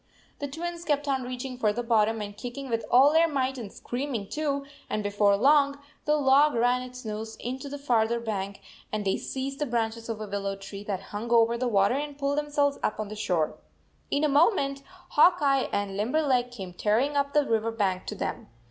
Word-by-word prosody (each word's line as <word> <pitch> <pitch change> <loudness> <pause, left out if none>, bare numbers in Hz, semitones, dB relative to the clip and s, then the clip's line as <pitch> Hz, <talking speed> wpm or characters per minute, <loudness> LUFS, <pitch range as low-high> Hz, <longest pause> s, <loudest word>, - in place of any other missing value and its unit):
The 285 - -3
Twins 340 +4 -5
kept 290 -2 0
on 270 -2 +1
reaching 250 0 -5
for 215 -3 +3
the 240 +3 -3
bottom 225 -1 +2
and 205 -1 -6
kicking 255 +4 -6
with 230 0 0
all 270 +4 +6
their 330 +1 +5
might 265 -3 -1
and 210 -4 -7
scream 265 +2 -4
ing, 200 -3 -4
too, 285 -2 -2 0.2
and 215 - -1
before 205 0 +3
long 280 +3 +4 0.3
the 300 - +3
log 285 0 +4
ran 245 +2 +2
its 250 -1 -9
nose 220 +1 -5
into 260 +3 -5
the 285 - -5
farther 235 -4 +1
bank 200 -3 -4 0.3
and 215 -1 -2
they 190 - +2
seized 270 +1 -4
the 295 - -1
branches 230 -1 -2
of 225 -2 -3
a 215 - -4
willow 200 0 -3
tree 195 +1 -9
that 195 -3 -3
hung 215 +3 -4
over 235 0 +4
the 250 +1 -1
water 200 -1 +3
and 290 +1 -3
pulled 285 +1 0
themselves 290 -1 0
up - - -1
on 215 -1 -3
the 215 - -6
shore. 180 -7 -1 0.5
In 285 - +1
a - - +4
moment 280 -2 +3 0.3
Hawk 355 +4 +6
Eye 275 -2 +2
and 200 -1 -2
Limberleg 250 +3 +1
came 195 -7 -8
tearing 225 +10 +1
up 280 0 0
the 295 -1 +4
river 225 -1 0
bank 195 -5 -1
to 210 - -4
them. - - -4
245 Hz, 210 wpm, -27 LUFS, 215-280 Hz, 0.5 s, all